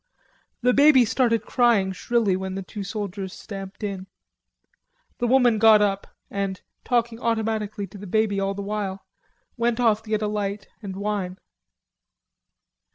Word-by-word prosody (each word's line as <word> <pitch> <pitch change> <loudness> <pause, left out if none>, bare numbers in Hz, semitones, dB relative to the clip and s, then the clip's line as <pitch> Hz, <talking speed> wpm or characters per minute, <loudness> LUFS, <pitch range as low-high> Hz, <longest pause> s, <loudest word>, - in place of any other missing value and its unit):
The 250 0 +4
baby 280 -3 +6
started 230 -1 +1
crying 235 -6 +3
shrilly 210 +1 +1
when 190 0 -4
the 195 - -4
two 200 +2 -7
soldiers 195 -2 -5
stamped 195 +1 -8
in. 195 -2 -4 1.1
The 240 - +1
woman 245 -3 +4
got 220 -1 +7
up 200 -1 0 0.2
and, 195 -1 -2 0.2
talking 235 -2 0
automatically 220 -3 -1
to 195 +1 -12
the 200 - -8
baby 210 0 +1
all 195 0 -1
the 200 - -5
while, 200 -2 -4 0.5
went 235 0 +1
off 225 -3 +3
to 220 - -14
get 215 0 0
a - - +1
light 205 -1 -3
and 195 -3 -6
wine. 200 -2 -3
210 Hz, 150 wpm, -24 LUFS, 195-230 Hz, 1.1 s, got